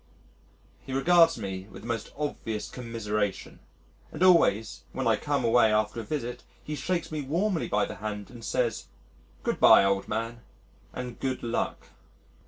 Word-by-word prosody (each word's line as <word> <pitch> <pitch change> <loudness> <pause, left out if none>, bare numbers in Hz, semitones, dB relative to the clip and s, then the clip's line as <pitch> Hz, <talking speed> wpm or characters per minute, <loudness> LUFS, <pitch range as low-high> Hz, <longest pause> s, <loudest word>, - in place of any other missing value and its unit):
He 130 - -7
regards 165 +3 +5
me 95 -3 -5
with - - -11
the - - -8
most 115 -2 -3
obvious 115 -7 -3
commiseration 105 -4 -3 0.5
and 160 - -2
always 165 - +4
when 130 - -2
I 115 - +5
come 140 +3 -1
away 115 -1 +5
after 105 +1 +1
a - - -4
visit 125 0 -4 0.2
he 150 - -5
shakes 170 +5 -2
me 155 -1 -2
warmly 170 +6 0
by 105 0 +1
the - - -8
hand 105 +1 -5
and 120 -2 -11
says, 115 - -1 0.6
"Good - - -1
bye, - - +8
old 100 0 +1
man, 115 +2 -3 0.5
and 125 -1 -6
good 130 -1 -2
luck." 120 0 -2
115 Hz, 160 wpm, -28 LUFS, 105-145 Hz, 0.6 s, bye